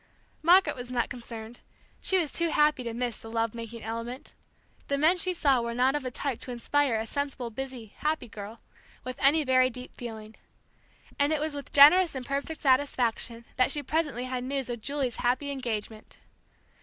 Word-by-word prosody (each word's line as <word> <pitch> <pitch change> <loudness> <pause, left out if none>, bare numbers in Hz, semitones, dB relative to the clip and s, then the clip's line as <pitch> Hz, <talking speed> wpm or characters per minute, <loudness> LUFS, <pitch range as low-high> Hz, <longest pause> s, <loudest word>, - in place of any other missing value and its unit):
Margaret 360 +5 +5
was 245 -1 -7
not 245 -2 0
concerned; 230 -1 -8 0.4
she 380 - +2
was 330 -6 0
too 335 -1 0
happy 300 -3 +3
to 235 -2 -4
miss 240 -1 -2
the 225 - -10
love 225 -1 -1
making 230 0 -7
element; 230 +4 -5 0.5
the 280 - 0
men 315 +5 +4
she 365 +1 -1
saw 280 -8 +2
were 235 0 -3
not 255 +2 +3
of 295 -2 -2
a 255 - -2
type 255 0 -3
to - - -10
inspire 260 +1 +1
a 220 0 -1
sensible 270 -1 -3
busy, 245 -3 -7
happy, 305 -4 -1
girl 215 +1 -9 0.4
with 255 0 -6
any 295 +3 +5
very 255 -1 +4
deep 250 0 -9
feeling. 220 -2 -8 0.9
And 285 +1 +3
it 310 - +1
was 310 0 -2
with 285 -1 -7
generous 310 +4 +7
and 260 -1 -4
perfect 280 +4 -3
satisfaction 250 -4 +1
that 255 - +4
she 295 0 -2
presently 290 -4 -1
had 255 -1 -3
news 270 -1 -3
of 240 -2 -4
Julie's 275 -2 -2
happy 255 +4 0
engagement. 220 -5 -5
255 Hz, 185 wpm, -28 LUFS, 235-285 Hz, 0.9 s, generous